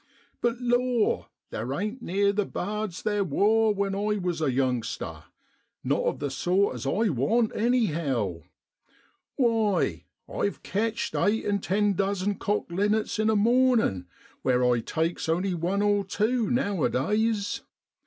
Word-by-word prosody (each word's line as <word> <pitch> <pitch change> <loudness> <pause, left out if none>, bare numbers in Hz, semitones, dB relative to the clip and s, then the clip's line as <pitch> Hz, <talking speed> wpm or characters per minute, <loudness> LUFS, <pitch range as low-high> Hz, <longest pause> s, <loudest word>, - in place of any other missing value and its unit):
But 240 0 0
law! 245 -2 +1 0.2
theer 120 +5 -3
ain't 215 +5 -3
neer 200 0 +1
the 210 +1 +1
bards 210 -1 -4
theer 205 -2 +1
wor 215 +6 +3
when 200 -1 -1
I 210 +1 0
was 175 -4 -2
a 150 -4 +2
youngster, 125 - -2 0.6
not - - +1
of - - 0
the 145 -1 -3
sort 180 +10 +1
as - - -5
I 220 +1 +1
want, 215 - +1
anyhow. 155 - 0 0.9
Why, 225 -6 +1 0.2
I've 200 - -3
ketcht 225 +3 -2
eight 205 +5 +1
an' 205 -1 +1
ten 205 +2 +1
dozen 200 +1 -1
cock 205 -4 -1
linnets 210 +4 0
in 215 0 +2
a 220 - +3
mornin' 230 - +3 0.3
where 125 -1 +2
I 120 -1 +3
takes 160 +7 -2
only 180 +3 +1
one 180 +4 0
or 205 -1 +2
tew 215 +4 0
nowadays. 210 - 0
200 Hz, 140 wpm, -27 LUFS, 170-220 Hz, 0.9 s, wor